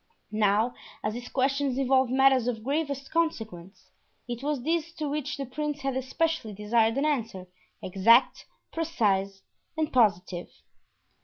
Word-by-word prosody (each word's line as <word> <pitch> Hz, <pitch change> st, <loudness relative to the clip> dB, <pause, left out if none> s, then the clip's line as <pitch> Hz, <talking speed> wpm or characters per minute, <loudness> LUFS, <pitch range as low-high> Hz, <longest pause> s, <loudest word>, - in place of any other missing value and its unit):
Now, 215 Hz, +2 st, +2 dB, 0.3 s
as 210 Hz, -, -1 dB
these 245 Hz, +1 st, -7 dB
questions 270 Hz, 0 st, 0 dB
involved 265 Hz, -1 st, +3 dB
matters 265 Hz, -2 st, +4 dB
of 225 Hz, -3 st, -2 dB
gravest 280 Hz, 0 st, -2 dB
consequence, 220 Hz, -, -3 dB, 0.4 s
it 240 Hz, 0 st, -5 dB
was 285 Hz, -3 st, -2 dB
these 330 Hz, +2 st, -1 dB
to 305 Hz, -, -3 dB
which 295 Hz, 0 st, -3 dB
the 275 Hz, -, -3 dB
prince 295 Hz, +3 st, -4 dB
had 270 Hz, -1 st, -2 dB
especially 260 Hz, -2 st, -1 dB
desired 220 Hz, +3 st, +1 dB
an 280 Hz, -, +1 dB
answer, 230 Hz, -11 st, -2 dB, 0.4 s
exact, 220 Hz, +7 st, +3 dB, 0.2 s
precise, 200 Hz, -, 0 dB, 0.5 s
positive. 185 Hz, -7 st, +1 dB
255 Hz, 130 wpm, -27 LUFS, 215-285 Hz, 0.5 s, matters